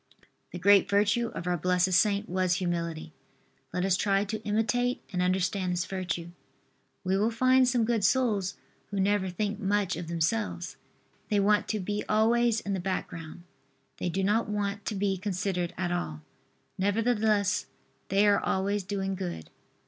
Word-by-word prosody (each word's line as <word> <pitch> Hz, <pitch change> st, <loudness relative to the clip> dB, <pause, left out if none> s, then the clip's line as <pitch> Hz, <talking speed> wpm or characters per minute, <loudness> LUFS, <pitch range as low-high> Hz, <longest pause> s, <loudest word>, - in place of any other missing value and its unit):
The -, -, -6 dB
great 200 Hz, +2 st, +5 dB
virtue 205 Hz, +4 st, +2 dB
of -, -, -5 dB
our 180 Hz, 0 st, 0 dB
blessed 180 Hz, +1 st, +2 dB
saint 200 Hz, +2 st, +3 dB
was 185 Hz, -1 st, +1 dB
humility. 170 Hz, -3 st, -3 dB, 0.6 s
Let 180 Hz, +1 st, -1 dB
us 190 Hz, -2 st, +3 dB
try 195 Hz, +1 st, +1 dB
to 215 Hz, +1 st, -4 dB
imitate 230 Hz, +4 st, 0 dB
and 180 Hz, -, 0 dB
understand 185 Hz, 0 st, 0 dB
this 175 Hz, +1 st, -1 dB
virtue. 175 Hz, -3 st, -4 dB, 0.7 s
We 190 Hz, 0 st, +1 dB
will 215 Hz, +2 st, +2 dB
find 255 Hz, +2 st, +4 dB
some 245 Hz, -2 st, +2 dB
good 230 Hz, -3 st, 0 dB
souls 210 Hz, -4 st, +2 dB, 0.3 s
who 200 Hz, -, -4 dB
never 195 Hz, -1 st, +1 dB
think 205 Hz, +3 st, -2 dB
much 205 Hz, -2 st, 0 dB
of 170 Hz, 0 st, -6 dB
themselves. 175 Hz, +2 st, -1 dB, 0.5 s
They 210 Hz, -2 st, +2 dB
want 205 Hz, +1 st, +3 dB
to 215 Hz, -, -1 dB
be 205 Hz, +2 st, -2 dB
always 230 Hz, +1 st, +3 dB
in 200 Hz, -, -3 dB
the 190 Hz, -, -1 dB
background. 175 Hz, -2 st, -5 dB, 0.5 s
They 180 Hz, -, -2 dB
do 190 Hz, +3 st, -1 dB
not 215 Hz, +3 st, +1 dB
want 205 Hz, 0 st, -2 dB
to 215 Hz, -, -2 dB
be 195 Hz, -1 st, 0 dB
considered 185 Hz, -3 st, -2 dB
at 175 Hz, -1 st, -1 dB
all. 80 Hz, -, -3 dB, 0.6 s
Nevertheless 210 Hz, -1 st, +1 dB, 0.4 s
they 195 Hz, +2 st, +4 dB
are 205 Hz, -1 st, +4 dB
always 200 Hz, +2 st, 0 dB
doing 195 Hz, 0 st, -2 dB
good. 180 Hz, -, -5 dB
200 Hz, 160 wpm, -28 LUFS, 180-210 Hz, 0.7 s, great